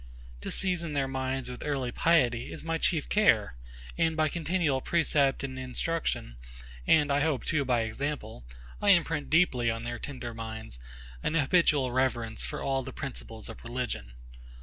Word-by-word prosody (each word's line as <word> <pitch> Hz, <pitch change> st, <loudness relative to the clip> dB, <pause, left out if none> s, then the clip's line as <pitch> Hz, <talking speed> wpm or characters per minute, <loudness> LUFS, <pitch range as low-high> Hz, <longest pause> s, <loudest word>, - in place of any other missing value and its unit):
To -, -, -4 dB
season 175 Hz, -4 st, 0 dB
their 140 Hz, -2 st, +1 dB
minds 130 Hz, 0 st, -2 dB
with 125 Hz, 0 st, -7 dB
early 135 Hz, -4 st, -1 dB
piety, 125 Hz, -7 st, +2 dB
is -, -, -6 dB
my 165 Hz, 0 st, -1 dB
chief 160 Hz, -3 st, +1 dB
care; 115 Hz, -, +3 dB, 0.5 s
and 160 Hz, -1 st, +2 dB
by 155 Hz, -1 st, +3 dB
continual 165 Hz, -4 st, 0 dB
precept 145 Hz, -5 st, +2 dB
and 130 Hz, -1 st, -4 dB
instruction, 130 Hz, -, -2 dB, 0.5 s
and 150 Hz, -2 st, +5 dB
I 140 Hz, -, +3 dB
hope 145 Hz, -3 st, +1 dB
too 155 Hz, -3 st, +1 dB
by 125 Hz, -2 st, +2 dB
example, 110 Hz, -, -4 dB, 0.4 s
I 205 Hz, -, +3 dB
imprint 165 Hz, -5 st, +3 dB
deeply 135 Hz, -8 st, +3 dB
on 115 Hz, 0 st, -2 dB
their 120 Hz, 0 st, -4 dB
tender 125 Hz, -4 st, -6 dB
minds 110 Hz, -, -7 dB, 0.4 s
an 155 Hz, -, -1 dB
habitual 145 Hz, -4 st, +3 dB
reverence 120 Hz, -3 st, 0 dB
for -, -, -4 dB
all 135 Hz, -1 st, +1 dB
the -, -, -7 dB
principles -, -, -7 dB
of -, -, -10 dB
religion. 120 Hz, -, -4 dB
135 Hz, 160 wpm, -29 LUFS, 120-160 Hz, 0.5 s, and